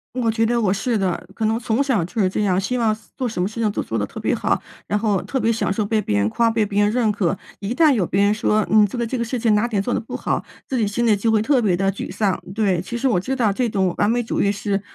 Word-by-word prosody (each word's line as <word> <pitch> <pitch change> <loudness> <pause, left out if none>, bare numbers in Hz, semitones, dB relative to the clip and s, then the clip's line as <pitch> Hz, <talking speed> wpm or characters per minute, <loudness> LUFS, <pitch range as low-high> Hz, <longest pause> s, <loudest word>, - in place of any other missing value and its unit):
我 240 -3 +1
觉 225 0 +1
得 235 +1 +1
我 200 -4 +2
是 230 +2 -1
的， 185 -3 -1
可 220 - -2
能 220 +1 +1
从 230 +2 0
小 260 -10 +1
就 210 +7 -3
是 190 - +3
这 210 - -1
样， 185 -2 +2
希 250 +6 -1
望 225 -3 +2 0.2
做 255 -3 -2
什 180 -5 -3
么 185 - +1
事 230 +2 -5
情 215 - +1
都 - - -2
做 115 - -3
得 105 - 0
特 - - -9
别 - - 0
好， - - 0 0.2
然 210 - 0
后 205 -4 +1
特 265 - -3
别 230 - +1
享 225 - -1
受 205 +1 0
被 215 +1 +1
别 105 - -1
人 100 +1 +2
夸、 230 - +2
被 225 -1 +1
别 205 0 +1
人 205 - +2
认 235 -2 +1
可， 195 -2 0 0.2
一 205 +4 -3
旦 310 -1 +5
有 200 -7 +1
别 195 - 0
人 200 +1 +4
说 215 -1 +1
你 215 -1 +6
这 220 +5 -5
个 235 - -1
这 255 +2 -3
个 235 - -1
事 240 +2 -3
情 220 -2 +3
哪 210 - +2
点 215 -5 0
做 245 - -2
得 - - 0
不 225 - -6
好， - - -2 0.2
自 260 - -2
己 225 - +2
心 235 +4 0
里 215 - +5
就 220 +3 0
会 215 -1 +3
特 260 +1 +2
别 185 -5 +2
地 195 +1 +1
沮 - - -6
丧。 200 -4 0 0.2
对， 195 -5 +1
其 235 +6 -5
实 265 - 0
我 225 -8 +2
知 255 +9 -2
道 220 -5 +2
这 245 +3 0
种 190 -4 0
完 205 +2 +3
美 240 - +1
主 230 - -2
义 200 - +2
是 200 -1 -2
215 Hz, 340 characters per minute, -21 LUFS, 200-235 Hz, 0.2 s, 你